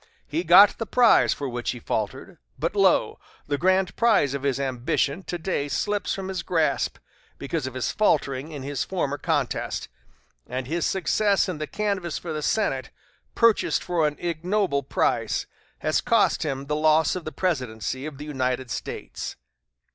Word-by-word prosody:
He 160 +4 -1
got 185 +4 +7
the 225 - -3
prize 240 +1 +5
for 140 - -2
which 120 -1 -3
he 125 - -3
faltered; 130 - -4 0.2
but, 165 +8 -2
lo! 195 -3 +3 0.3
the 145 -1 -2
grand 185 +1 +2
prize 215 - +3
of 140 - -3
his 140 -1 0
ambition 135 +4 -1
to 175 - -3
day 160 -4 -2
slips 205 +7 -1
from 195 -1 -5
his 190 -2 -3
grasp, 165 -3 0 0.4
because 140 0 -3
of 130 - -7
his 130 - -1
faltering 145 -7 +1
in 145 -3 -7
his 140 -1 -2
former 145 -7 -2
contest, - - -1 0.6
and 130 +1 -4
his 165 +6 -1
success 200 +3 +2
in 180 -5 -4
the 155 - -3
canvass 200 -5 -2
for 170 -2 -5
the 155 - -3
Senate, 215 +8 0 0.5
purchased 230 -2 +3
for 165 -3 +1
an 150 - -3
ignoble 175 -1 0
price, 140 - 0 0.4
has 155 - +1
cost 230 -3 +2
him 140 -3 -2
the 150 +1 -1
loss 155 +1 +3
of 180 - -4
the 155 - -5
presidency 130 - -2
of 150 -3 -8
the 145 - -7
United 130 -4 -2
States." - - -5
155 Hz, 170 wpm, -25 LUFS, 140-185 Hz, 0.6 s, got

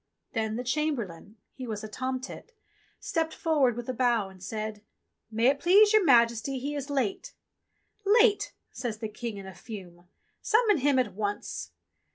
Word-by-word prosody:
Then 220 -1 -1
the 245 - -3
Chamberlain 240 - -2
— - - -53
he 255 -2 -6
was 215 -2 -4
a - - -4
tomtit 260 - -5 0.3
— - - -36
stepped 320 -1 0
for 320 -2 0
ward 250 -4 +4
with 240 - -5
a 255 - -1
bow 235 -5 +1
and 190 -1 -16
said: 215 +2 -4 0.2
*' - - -50
May 225 +2 +1
it 275 +2 +4
please 410 +6 +6
your 430 -2 +6
Majesty 235 -1 +4
he 280 +3 -3
is 285 -1 -4
late." 275 - -2 0.7
"Late.?" 425 +1 +4 0.2
says 230 -4 -4
the 220 0 -4
King 220 0 -5
in 195 - -8
a 190 - -8
fume. 180 -5 -10 0.3
"Summon 440 -4 +3
him 280 0 +3
at 240 -7 +1
once." 205 0 -3
245 Hz, 185 wpm, -28 LUFS, 215-290 Hz, 0.7 s, please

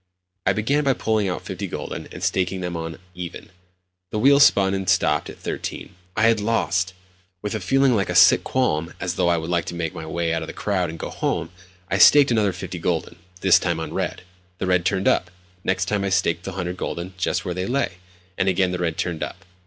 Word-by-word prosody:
I 95 - +5
began 135 +9 +1
by 135 -1 +3
pulling 110 -5 0
out 90 - -4
fifty - - -5
gülden, - - -6
and - - -8
staking 95 0 0
them 90 -1 -3
on 80 0 -5 0.2
"even." 90 0 -8 0.6
The 105 - -3
wheel 140 +5 +5
spun 100 -9 +5
and 95 -1 -2
stopped 75 -5 +2
at - - -10
13. - - -5 0.2
I 110 - +2
had 115 -1 +4
lost! 95 -4 0 0.5
With 105 - -2
a 110 - -2
feeling 135 0 +3
like 100 -3 0
a 90 - -2
sick 85 +2 +7
qualm, 85 -11 0
as 90 -2 -2
though 90 -1 +1
I 85 - +3
would 80 +2 -4
like 85 -1 +1
to - - -5
make 85 -2 -3
my 80 - -7
way 85 +1 -1
out 80 - -1
of 80 - -5
the - - -7
crowd 95 -5 -1
and 80 - -7
go - - -5
home, 80 - -2 0.4
I 95 - +1
staked 145 +4 +7
another 105 -4 +3
fifty 90 -1 -7
gülden—this 90 +2 +1
time - - -1
on - - -4
the - - -9
red. - - -3 0.3
The - - -2
red 90 -1 +2
turned 95 0 +1
up. 90 - +2 0.3
Next 95 -1 0
time 100 +1 -1
I 100 - 0
staked 85 -2 +1
the - - -3
100 90 -1 -4
gülden 85 +1 -4
just 85 - -1
where 90 - -2
they 90 +1 -3
lay—and 90 -7 -3
again 95 0 +2
the 90 - -3
red 85 -2 -1
turned 85 -3 -2
up. 95 +2 -6
90 Hz, 225 wpm, -23 LUFS, 85-100 Hz, 0.6 s, sick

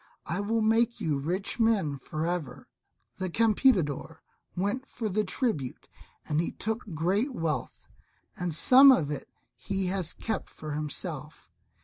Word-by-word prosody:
I 170 +5 -2
will 220 +3 0
make 230 +2 +2
you 155 -8 0
rich 180 - -2
men 210 -10 +2
for 155 +4 -4
ever. 165 -8 -4 0.5
The 185 0 -2
Campeador 180 - +2 0.3
went 205 +9 -2
for 225 - -4
the 210 +2 +1
tribute 185 - -2 0.4
and 155 +1 +1
he 170 - -3
took 220 +1 -2 0.2
great 200 - 0
wealth, 165 -5 -3 0.5
and 175 -3 -3
some 265 - +8
of 150 - +2
it 145 - -5 0.3
he 195 -1 -3
has 185 -2 -1
kept 220 - -4
for 155 -1 -8
himself. 150 -1 -5
185 Hz, 140 wpm, -28 LUFS, 155-225 Hz, 0.5 s, some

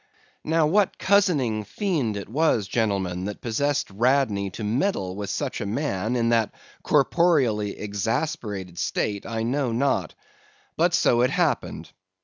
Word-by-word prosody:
Now 160 0 +2
what 195 +5 +2
cozening 155 - +2
fiend 135 - -1
it 100 - -6
was, 120 -4 +1
gentlemen, 95 -5 -1
that 105 0 -5
possessed 140 +3 -1
Radney 110 -2 +1
to 105 - -7
meddle 105 - -1
with 100 -1 -5
such 135 +2 -3
a - - -2
man 115 -2 -1
in 115 -1 +1
that 115 -2 +2 0.3
corporeally 135 - +2
exasperated 105 - -3
state, 100 -2 -2
I 115 -1 -2
know 130 +1 0
not; 135 +4 0 0.6
but - - +2
so 120 - +3
it 125 - +3
happened. - - -1
115 Hz, 135 wpm, -24 LUFS, 105-145 Hz, 0.6 s, so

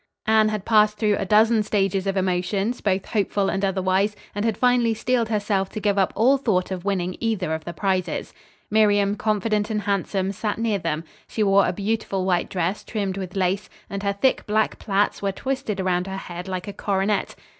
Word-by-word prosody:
Anne 220 0 +4
had 215 -2 -3
passed 210 -1 +4
through 210 -1 +2
a - - -2
dozen 220 +2 +4
stages 195 -2 0
of 195 0 0
emotions, 190 +5 0
both 190 -2 0
hopeful 200 -2 0
and 195 - -2
otherwise, 190 +1 +1 0.2
and 205 - -2
had 225 -2 0
finally 245 -2 +3
steeled 235 0 0
herself 205 -3 0
to - - -5
give 205 -1 +1
up 190 - +2
all 255 +6 +4
thought 195 -8 0
of 185 -2 -4
winning 185 -2 -1
either 205 -8 -1
of 160 0 -4
the 170 - -4
prizes. 185 0 -2 0.4
Miriam, 205 -2 +3
confident 210 0 0
and 210 -1 -1
handsome, 195 -1 -1
sat 210 +1 -3
near 220 -3 0
them. 155 -2 -2 0.2
She 220 - -1
wore 200 -1 +4
a - - +1
beautiful 200 -1 -2
white 180 -2 +1
dress 180 +2 -2
trimmed 200 -4 -3
with 185 -1 -6
lace, 190 +1 0 0.2
and 200 0 -3
her 200 0 0
thick, 255 +7 +1
black 215 +1 +1
plaits 200 0 0
were 200 -1 0
twisted 260 -2 -3
around 185 -1 0
her 190 0 -4
head 180 -1 -7
like 185 +1 -4
a 205 - -5
coronet. 195 +1 -1
200 Hz, 200 wpm, -23 LUFS, 190-215 Hz, 0.4 s, Anne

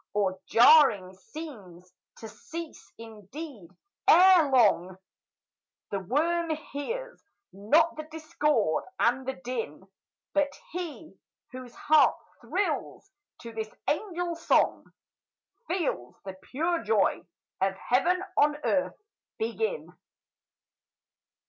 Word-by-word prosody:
Oh, 190 -2 0
jarring 225 -6 +6
scenes! 190 - -11 0.2
to 225 - -9
cease, 320 +9 -9
indeed, 225 - -10 0.4
ere 360 -3 +7
long; 195 -8 +3 0.9
The 200 - -1
worm 325 - 0
hears 390 - -5 0.3
not 295 - +2
the 310 0 -7
discord 300 - 0 0.2
and 245 +2 +1
the 265 - -2
din; 230 - -6 0.5
But 290 -1 0
he 330 -2 -7 0.3
whose 255 -2 -10
heart 305 0 +4 0.3
thrills 390 - -3 0.3
to 230 -1 -8
this 220 -1 -4 0.2
angel 350 0 -1
song, 335 0 +1 0.8
Feels 300 - -2
the 190 - -6
pure 325 - -2
joy 215 -3 +1 0.4
of 195 0 +1
heaven 345 - +1
on 295 0 +4
earth 280 -1 0 0.4
begin! 445 - -3
270 Hz, 100 wpm, -28 LUFS, 210-330 Hz, 0.9 s, ere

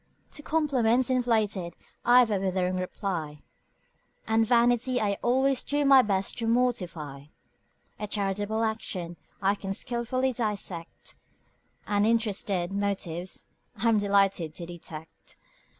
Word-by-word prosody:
To 295 - -9
compliments 260 -6 +2
inflated 215 -8 0 0.3
I've 245 -1 +5
a 200 - +1
withering 185 -1 0
reply; 175 -5 -4 0.8
And 225 0 +2
vanity 245 +1 +3
I 200 -2 0
always 265 +2 +2
do 290 0 0
my 275 -1 +8
best 195 -3 -1
to 230 - -2
mortify; 180 - -1 0.7
A 210 - -3
charitable 205 +2 -1
action 185 -6 -3 0.3
I 195 +1 +4
can 195 -1 -4
skilfully 255 +3 -1
dissect: 200 -7 -4 0.7
And 205 0 +2
interested 200 -5 0
motives 190 -3 -3 0.3
I'm 225 0 +2
delighted 195 -5 +2
to 170 - -6
detect. 165 -2 -10
210 Hz, 115 wpm, -27 LUFS, 185-240 Hz, 0.8 s, my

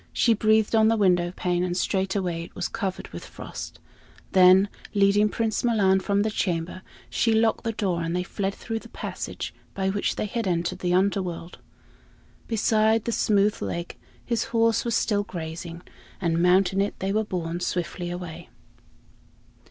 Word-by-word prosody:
She 230 - +4
breathed 215 0 +2
on 220 -1 +5
the 225 0 +3
window 180 -4 +3
pane, 180 -1 0
and 180 -1 -1
straightway 190 -3 -1
it - - -17
was 180 - -2
covered 190 -4 -4
with - - -8
frost; - - -8 0.5
then, 185 +1 +7 0.3
leading 200 +1 +4
Prince 220 0 -1
Milan 200 -5 +3
from 200 +1 +1
the 220 - -1
chamber, 180 -2 -2 0.3
she 225 - +1
locked 225 0 +2
the 230 - -1
door, 190 -6 -1
and 165 +1 -2
they 180 - 0
fled 195 +1 -3
through 225 -1 -4
the - - -14
passage - - -5 0.2
by 190 -1 0
which 200 +1 -1
they - - -2
had 225 +1 -2
entered 175 +1 -1
the 180 -2 -1
Underworld. 185 -3 -1 0.9
Beside 220 0 +2
the 235 - 0
smooth 210 -2 +2
lake 170 0 -4 0.3
his 235 -2 0
horse 230 -1 +2
was 235 -2 0
still 205 -2 +1
grazing, 170 -1 -7 0.4
and 170 -2 +1
mounting 185 +2 +4
it, 200 - -1
they 195 +1 -2
were 215 +1 +2
borne 175 -4 -3
swiftly 175 0 -3
away. 175 -1 -7
195 Hz, 165 wpm, -25 LUFS, 175-215 Hz, 0.9 s, then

